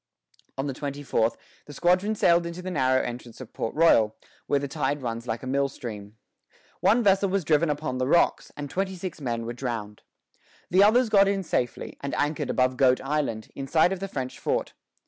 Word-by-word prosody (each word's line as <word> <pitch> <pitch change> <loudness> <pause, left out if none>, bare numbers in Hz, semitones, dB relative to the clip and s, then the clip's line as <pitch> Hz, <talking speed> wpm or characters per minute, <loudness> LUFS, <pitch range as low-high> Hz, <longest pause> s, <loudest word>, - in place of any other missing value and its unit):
On 135 - -2
the 140 - -2
twenty 145 +1 -5
fourth 115 -4 +1 0.3
the 145 - -9
squadron 185 +7 +2
sailed 170 -3 +3
into 170 +2 -7
the 185 - -4
narrow 130 -4 +2
entrance 120 -1 -7
of 130 - -10
Port 110 - -4
Royal, 115 -10 +4 0.3
where 145 - +2
the 140 0 -2
tide 145 -1 -2
runs 115 0 -4
like 115 +2 -3
a - - -5
mill 140 +1 +1
stream. 105 -4 -8 0.6
One 235 +3 +3
vessel 195 -1 +3
was 195 -1 0
driven 155 +1 +3
upon 145 -3 -2
the 130 - 0
rocks, 170 +4 +2
and 145 -1 -4
twenty 190 +6 -2
six 180 -3 -6
men 115 -3 -2
were 120 - -4
drowned. 115 -4 -5 0.7
The 185 +2 +5
others 230 +3 +4
got 200 -2 +5
in 195 -1 0
safely, 125 -7 -3
and 140 - -3
anchored 145 -2 -1
above 130 0 +1
Goat 130 -1 +4
Island, 135 -6 -2
in 135 -1 -6
sight 165 +5 +3
of 190 - -5
the 195 - -4
French 130 -8 -5
fort. - - -1
140 Hz, 205 wpm, -26 LUFS, 125-175 Hz, 0.7 s, The